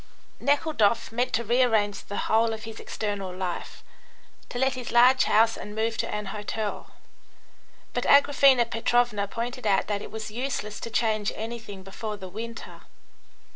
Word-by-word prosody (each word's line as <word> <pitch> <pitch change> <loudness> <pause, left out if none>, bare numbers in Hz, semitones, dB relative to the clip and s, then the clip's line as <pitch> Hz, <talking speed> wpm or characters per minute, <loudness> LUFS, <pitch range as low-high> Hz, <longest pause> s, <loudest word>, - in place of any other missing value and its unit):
Nekhludoff 255 -7 +2
meant 245 +2 0
to 235 - +1
rearrange 225 -3 +2
the 205 - -5
whole 225 +1 +3
of 220 0 -7
his 225 -1 -8
external 205 -3 -4
life, 180 -1 -5 0.7
to - - -5
let 265 +1 +2
his 255 -2 -6
large 250 +2 +6
house 225 +2 +4
and 210 - -8
move 225 +1 0
to - - -1
an 210 0 -3
hotel, 210 0 -4 1.0
but - - -1
Agraphena 275 -3 +6
Petrovna 230 -3 +1
pointed 235 +2 -4
out 195 -1 +3
that 205 -1 -2
it - - -7
was 220 -1 -6
useless 225 -3 -3
to - - -6
change 215 -2 +1
anything 220 -3 -7
before 210 +2 -6
the 190 -2 -8
winter. 230 +4 -8
225 Hz, 155 wpm, -26 LUFS, 210-240 Hz, 1.0 s, large